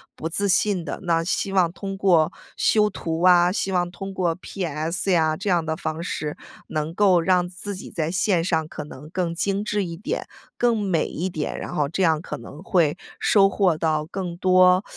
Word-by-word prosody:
不 160 - -4
自 200 +4 0
信 190 -2 +2
的。 - - -5
那 165 -1 +1
希 195 +2 -1
望 180 -3 +3
通 195 +2 -6
过 175 -5 +3 0.2
修 210 -1 +3
图 165 -2 -3
啊， 180 -1 +6
希 195 0 -1
望 175 -1 +1
通 195 +1 -7
过 175 -3 0
PS 175 0 -3
呀 160 -3 +3
这 200 +5 -3
样 175 -3 +2
的 160 - -1
方 155 +1 -4
式， 150 -4 -4 0.3
能 155 +1 -3
够 190 -2 +4
让 180 0 +2
自 195 +3 -6
己 185 - -9
在 160 -1 -2
线 185 -2 +1
上 160 -3 0
可 155 - -7
能 150 +1 -11
更 175 -2 -2
精 195 +3 -1
致 210 -1 -1
一 170 -2 -6
点、 200 - -4 0.3
更 240 -2 +2
美 190 -5 +1
一 180 - -3
点。 155 -5 -4
然 - - -6
后 145 -2 +1
这 185 +5 -1
样 160 -3 +3
可 - - -6
能 140 +6 -11
会 170 -5 +2 0.2
收 195 -2 +4
获 185 -5 +2
到 155 -1 0
更 180 0 -5
多 185 +1 +5
180 Hz, 220 characters per minute, -23 LUFS, 160-195 Hz, 0.3 s, 啊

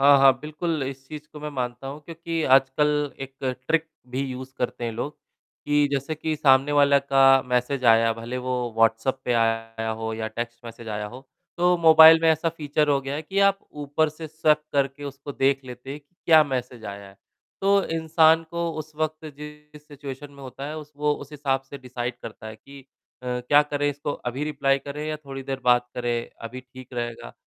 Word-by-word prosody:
हाँ, 140 +1 +7
हाँ, 135 -1 +7
बिल्कुल 155 0 -3
इस 135 0 -6
चीज़ 150 -1 -8
को 150 - -10
मैं 150 - -4
मानता 125 -1 -4
हूँ 140 +3 -7
क्योंकि 165 0 -4
आजकल 145 +2 +2
एक 135 0 -8 0.3
ट्रिक 165 0 +2 0.2
भी 130 +2 -2
यूज़ 130 +1 -7
करते 120 -1 -2
हैं 115 - -2
लोग 130 +6 -4 0.5
कि 145 0 +3
जैसे 140 +3 -1
कि 155 +1 -2
सामने 135 0 +4
वाले 140 -1 +5
का 135 0 +1 0.3
मैसेज 125 +1 0
आया 115 0 +5
भले 115 +3 -5
वो 125 0 -2 0.2
व्हाट्सएप 115 +4 +2
पे 125 - +1
आया 115 -1 0
हो 110 0 -3
या 110 0 -3
टेक्स्ट 120 +1 -6
मैसेज 115 0 -9
आया 105 -1 -3
हो, 125 +5 -10 0.4
तो 180 0 +4
मोबाइल 160 0 +9
में 165 - +5
ऐसा 160 +1 +1
फीचर 150 -2 -1
हो 140 -1 +3
गया 135 +1 -4
है 155 - -3
कि 190 +5 -3
आप 200 0 +4
ऊपर 150 +1 0
से 155 +1 -8
स्वैप 155 -1 +2
करके 140 0 0
उसको 140 +1 -7
देख 135 0 +2
लेते 125 +1 -9
हैं 145 - -6
कि 145 +5 -42
क्या 160 -2 +8
मैसेज 125 -4 -4
आया 100 0 -7
है। 95 - -18 0.4
तो 200 0 +3
इंसान 160 0 +3
को 170 0 -2
उस 155 0 -7
वक़्त 155 0 -2
जिस 150 0 -12
सिचुएशन 145 -1 -8
में 140 -1 -13
होता 135 +1 -7
है 155 - -6
उस 150 0 -11
वो 150 0 +1
उस 145 0 -10
हिसाब 140 -2 0
से 140 - -7
डिसाइड 125 -1 -5
करता 110 0 -9
है 110 0 -8
कि 140 +5 -14 0.4
अ, 125 - -9
क्या 145 +4 +5
करें 145 0 -1
इसको 145 0 -3
अभी 125 +4 -4
रिप्लाई 140 -2 +1
करें 145 +2 -6
या 155 - -2
थोड़ी 135 -3 -8
देर 135 0 -4
बात 125 0 +4
करें, 120 -1 -2
अभी 120 +3 -6
ठीक 130 0 -14
रहेगा। 120 - -5
140 Hz, 205 wpm, -24 LUFS, 125-150 Hz, 0.5 s, मोबाइल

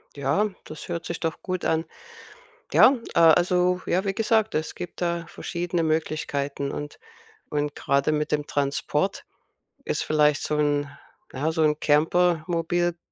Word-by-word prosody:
Ja, 145 +10 +1
das 155 - -9
hört 170 -1 -4
sich 170 - -4
doch 165 -2 -3
gut 185 -1 -3
an. 160 0 +1 0.9
Ja, 270 - +7 0.2
äh, - - +2
also, 180 +2 +4
ja, 185 +3 +1
wie 195 -1 -1
gesagt, 220 0 +1
es 155 +1 -2
gibt 180 -1 -8
da 170 -1 -1
verschiedene 175 -1 -3
Möglichkeiten 150 -3 -2
und 145 0 -6 0.5
und 145 -1 -1
grade 140 +2 +1
mit 150 0 -1
dem 150 -1 0
Transport 140 -1 -1 0.6
ist - - -1
vielleicht 150 -1 +2
so 150 - -1
'n, 145 -1 +1 0.4
ja, 155 +4 -1
so 160 - 0
'n 150 -1 +2
Camper-Mobil 170 +2 +1
160 Hz, 145 wpm, -25 LUFS, 150-175 Hz, 0.9 s, Ja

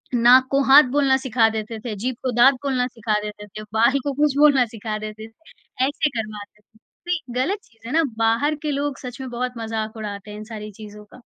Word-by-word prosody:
नाक 245 +2 +6
को 275 - +3
हाथ 275 +3 +8
बोलना 275 -2 +3
सिखा 250 -4 +2
देते 220 0 -5
थे, 220 -2 -5
जीभ 245 +5 -3
को 255 - 0
दाँत 245 +4 +6
बोलना 255 -3 0
सिखा 220 -3 -2
देते 210 0 -8
थे, 215 +2 -9
बाल 255 +5 +3
को 285 -1 -2
कुछ 290 0 +1
बोलना 285 -4 +5
सिखा 220 -1 -5
देते 215 +1 -8
थे। 255 0 -6
ऐसे 295 +2 0
करवाते 215 -3 -7
थे, 220 +1 -30 0.3
ये 355 - +1 0.2
गलत 390 +9 -1
चीज़ 225 0 -16
है 255 - -5
ना 330 0 +4
बाहर 230 +7 +2
के 300 - -1
लोग 285 0 -2
सच 250 0 -8
में 260 - -6
बहुत 250 +1 -3
मज़ाक 220 -1 -4
उड़ाते 210 -1 -7
हैं 210 - -8
इन 215 - -7
सारी 215 -1 -8
चीज़ 210 0 -12
का। 250 - -15
235 Hz, 220 wpm, -22 LUFS, 215-270 Hz, 0.3 s, हाथ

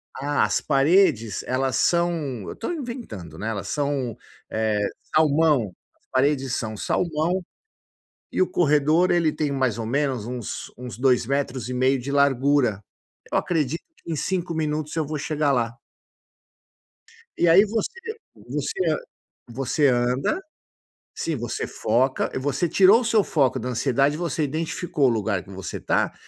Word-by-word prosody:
Ah, 145 +1 +1
as - - +1
paredes, 140 - +3
elas 130 0 0
são, 165 -7 +1
eu - - -4
estou 230 - -4
inventando, 235 - -7
né? 110 - -3
Elas 100 -3 -4
são, 140 -5 -1 0.3
eh, 110 -1 0 0.3
salmão, 150 - +3 0.3
as - - -41
paredes 135 -1 +1
são 110 -3 -4
salmão 170 - 0 0.9
e - - -2
o 185 - +5
corredor 155 +2 +3
ele 165 -3 +3
tem 150 -1 -1
mais 130 -5 0
ou 115 - -3
menos 135 -2 0
uns 120 -3 -5
uns 125 -5 -7
2,5 130 0 +1
de 135 +3 -5
largura. 140 -5 +3 0.5
Eu - - 0
acredito 160 -2 -1 0.2
que 165 - -4
em - - -1
5 175 +1 -2
minutos 155 -1 -2
eu 160 - 0
vou 150 +1 -4
chegar 150 0 0
lá. 120 -3 0 1.6
E 175 - +4
aí 185 +5 +7
você 220 +1 -1 0.6
você 380 - -1 0.6
você 135 +4 +1
anda, 125 - +1 0.8
sim, 165 - -2
você 120 0 -3
foca, 125 +4 0
você 145 +5 0
tirou 195 +6 +6
o - - -4
seu 220 -3 +3
foco 135 -4 +1
da 125 - -4
ansiedade, 135 +4 +1
você 165 -2 -1
identificou 155 0 -1
o 130 - +6
lugar 105 -4 0
que - - -18
você 95 -2 -6
está - - 0
140 Hz, 145 wpm, -24 LUFS, 125-160 Hz, 1.6 s, aí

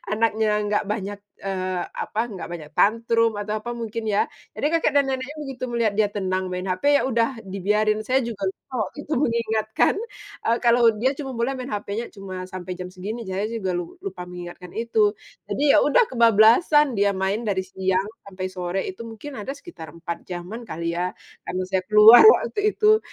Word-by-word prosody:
anaknya 220 0 +1 0.2
gak 210 0 +1
banyak, 205 -1 -4 0.3
eee, 185 -1 -2 0.2
apa, 220 - -3 0.2
gak 180 - -6
banyak 155 -3 -8
tantrum 230 +1 +3
atau 210 +1 -3
apa 240 - -4
mungkin 230 -1 -5
ya. 205 - +2 0.3
Jadi - - -2
kakek 305 - +1
dan 285 -1 +4
neneknya 265 +3 -3
begitu 270 -3 -5
melihat 230 -3 +1
dia 215 -1 +3
tenang 185 -2 -2
main 180 +1 -4
HP, 185 +7 -3 0.2
ya - - -1
udah 235 0 0
dibiarin, 210 +3 0
saya 260 +3 +2
juga 230 -5 -4
lupa 255 - -17 0.2
waktu - - -16
itu 305 - 0
mengingatkan, 220 -4 +1 0.5
eee, 230 +1 +3
kalau 235 -1 +5
dia 260 +3 +3
cuma 275 -3 -5
boleh 240 +3 0
main 255 +1 -6
HPnya 210 +2 -3
cuma 190 -2 -7
sampai 185 0 -6
jam 180 0 -6
segini, 210 +6 -5
saya 190 +2 -2
juga 220 -5 -3
lu 175 -1 -4
lupa 180 - -6
mengingatkan 180 0 -9
itu. 220 -2 +2 0.3
Jadi 285 - -3
ya - - +7
udah, 460 +11 +5
kebablasan, 235 - +5
dia 200 0 +3
main 190 +4 -1
dari 190 -2 +1
siang 190 +1 -1 0.2
sampai 185 -1 -5
sore 180 0 -3
itu 190 +5 -7
mungkin 245 +6 -9
ada 240 +7 -4
sekitar 280 - -11
4 170 0 -6
jaman 185 +6 -6
kali 170 -2 -3
ya 180 +1 -1 0.3
karena 185 - -2
saya 190 -1 +1
keluar 215 +3 +9
waktu 425 -1 +4
itu. 430 0 +5
215 Hz, 185 wpm, -23 LUFS, 185-235 Hz, 0.5 s, keluar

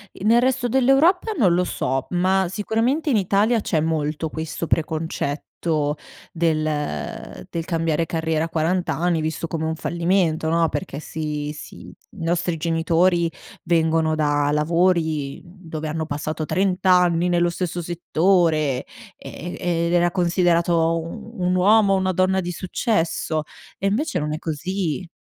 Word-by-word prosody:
E - - -9
nel 230 +2 +5
resto 255 -1 +1
dell'Europa 270 - +3
non 190 - +3
lo 180 - +2
so, 135 -6 -2
ma 190 +2 +2
sicuramente 225 - 0
in 255 - +3
Italia 205 +4 +2
c'è 165 - 0
molto 155 0 -1
questo 160 +1 -4
preconcetto, 155 -2 -2 0.9
del 160 -2 +1 0.8
del 165 - -3
cambiare 165 -2 0
carriera 160 -1 -1
a 165 - -7
40 170 +3 0
anni, 170 -1 +1
visto 160 +1 -3
come 160 0 -3
un 160 0 -1
fallimento, 170 -1 0
no, 165 0 +3
perché 155 -6 -4
si 150 -2 -4
si - - -10
i 205 - -15
nostri 170 0 0
genitori 165 +1 +2 0.3
vengono 160 -1 +2
da 145 -2 +1
lavori, 160 -2 +1
mhmm, 180 0 -16
dove 155 -1 -4
hanno 160 +1 -2
passato 155 +1 -3
30 190 +2 0
anni 180 -2 +4
nello 175 0 +2
stesso 175 0 -3
settore, 165 -4 +1 0.3
ehm, - - -10 0.2
e 170 -1 0
ed 170 - -1
era 175 0 +3
considerato 170 -2 +2
un 215 +7 -8
un 180 0 +1
uomo 200 +2 +5
o 195 - +3
una 185 0 +1
donna 185 +1 +2
di 175 0 -4
successo 170 -4 -1 0.4
e 195 - 0
invece 220 - 0
non 150 0 -2
è 155 - -2
così. 170 +2 -3
170 Hz, 150 wpm, -22 LUFS, 160-185 Hz, 0.9 s, nel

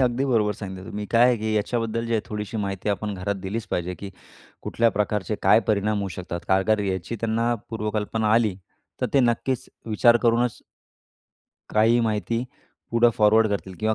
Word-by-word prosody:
अगदी 125 +1 +1
बरोबर 110 -5 +2
सांगितलं 95 -2 -8
तुम्ही. 105 0 -4
काय 115 +1 +5
आहे 125 -1 +3
की 110 0 -2
याच्याबद्दल 115 +1 -1
जे 115 - -3
आहे 110 - +2
थोडीशी 105 +1 -5
माहिती 100 -1 -3
आपण 105 +1 -1
घरात 100 +2 -2
दिलीच 105 +4 -4
पाहिजे, 90 +1 -2
की 95 +3 -8 0.5
कुठल्या 115 0 +2
प्रकारचे 105 0 -1
काय - - +6
परिणाम 105 0 +1
होऊ 100 - -2
शकतात 85 0 -6
कारण 95 0 +3
का 110 -1 +2
याची 95 +3 -3
त्यांना 115 +1 +1 0.2
पूर्वकल्पना 110 0 -1
आली, 110 -5 +2 0.4
तर - - +1
ते 135 - +6
नक्कीच 120 +1 0 0.2
विचार 120 +2 +4
करूनच 120 0 +2 1.2
काही 115 +2 +4
माहिती 115 +1 -1 0.5
पुढे 115 0 +5
फॉरवर्ड 110 +1 +4
करतील 95 -2 -4
किंवा 110 0 +1
110 Hz, 170 wpm, -24 LUFS, 100-115 Hz, 1.2 s, काय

